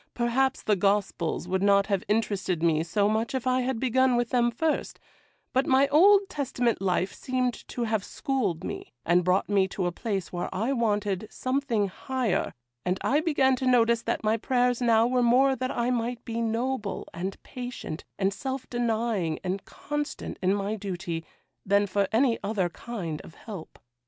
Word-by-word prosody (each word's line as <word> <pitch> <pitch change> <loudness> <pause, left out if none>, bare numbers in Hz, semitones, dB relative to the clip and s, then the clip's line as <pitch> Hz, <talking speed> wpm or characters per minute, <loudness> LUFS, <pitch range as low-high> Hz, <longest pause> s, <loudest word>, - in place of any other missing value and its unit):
Perhaps 260 +3 +1
the 210 - +3
Gospels 195 -3 0
would 190 +1 0
not 200 0 +4
have 200 -2 0
interested 200 -5 0
me 160 -2 +3
so 200 +5 +1
much 220 +4 0
if 260 - -2
I 255 0 +2
had 250 -2 -1
begun 260 0 +3
with 240 -1 0
them 240 -1 +3
first; 310 +7 -1 0.5
but 260 +1 +2
my 270 +1 +5
Old 390 +7 +6
Testament 250 - -1
life 185 0 0
seemed 255 -1 -1
to 240 - -3
have 220 -3 0
schooled 255 - -2
me, - - -6
and 175 +1 +4
brought 185 +2 +2
me 195 -2 +3
to 190 0 -3
a 175 - 0
place 195 0 -3
where 175 - -2
I 225 +8 0
wanted, 210 -4 0
something 255 -6 0
higher, 250 +2 -2 0.3
and 180 +1 0
I 285 - +2
began 280 -5 +3
to 260 - -2
notice 235 -2 +4
that - - -2
my 215 +1 +2
prayers 245 +1 +1
now 230 -2 +4
were 250 +1 +2
more 260 +3 +4
that 255 0 -2
I 240 0 0
might 240 0 -2
be 230 0 -3
noble, 230 -1 -2
and 185 +3 -4
patient, 245 -9 -6
and 195 0 +1
self 265 +4 -4
denying, 225 -8 0
and 190 +1 -2
constant 295 0 -5
in 190 +2 +2
my 200 +1 -2
duty, 175 -4 -4 0.4
than 200 +1 +3
for 200 0 0
any 235 +1 +3
other 200 -3 0
kind 175 -5 -5
of 165 - -14
help. 200 -8 -9
225 Hz, 175 wpm, -27 LUFS, 195-255 Hz, 0.5 s, Old